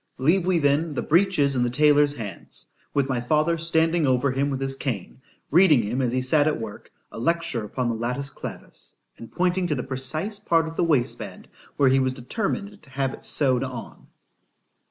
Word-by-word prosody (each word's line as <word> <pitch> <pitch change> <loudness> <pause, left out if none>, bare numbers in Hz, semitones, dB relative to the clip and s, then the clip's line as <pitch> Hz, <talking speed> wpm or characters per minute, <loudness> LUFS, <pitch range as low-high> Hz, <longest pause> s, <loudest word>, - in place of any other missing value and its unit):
—— - - -47
——Leave 170 +7 +2
we 185 -2 +3
then 145 +1 +1
the - - -1
breeches 165 -5 +2
in 125 - +1
the 120 - +1
taylor's 145 +2 +4
hands, 105 -9 -8 0.3
with 140 -2 +1
my 130 -3 -1
father 155 +6 +2
standing 165 -1 +1
over 130 +1 +2
him 135 +2 0
with 135 -2 -2
his 135 0 -1
cane, 130 -2 -5 0.3
reading 155 -6 +5
him 120 +6 -2
as 125 -2 0
he 130 +1 0
sat 145 +3 +3
at 155 - 0
work 110 -2 -8 0.2
a - - -8
lecture 165 -4 0
upon 125 +4 -3
the 120 - 0
latus 125 +5 -3
clavus, - - -8 0.2
and 115 - -10
pointing 180 0 0
to 150 - 0
the 125 - -3
precise 155 +10 -2
part 165 -1 +1
of 160 - -7
the - - +1
waistband, 145 -8 -1 0.3
where 140 -2 +4
he 135 +1 +4
was 130 -1 +1
determined 200 - -4
to 145 - -20
have 135 0 -2
it - - -11
sewed 130 -3 +1
on. 130 -3 -8
140 Hz, 200 wpm, -24 LUFS, 130-165 Hz, 0.3 s, reading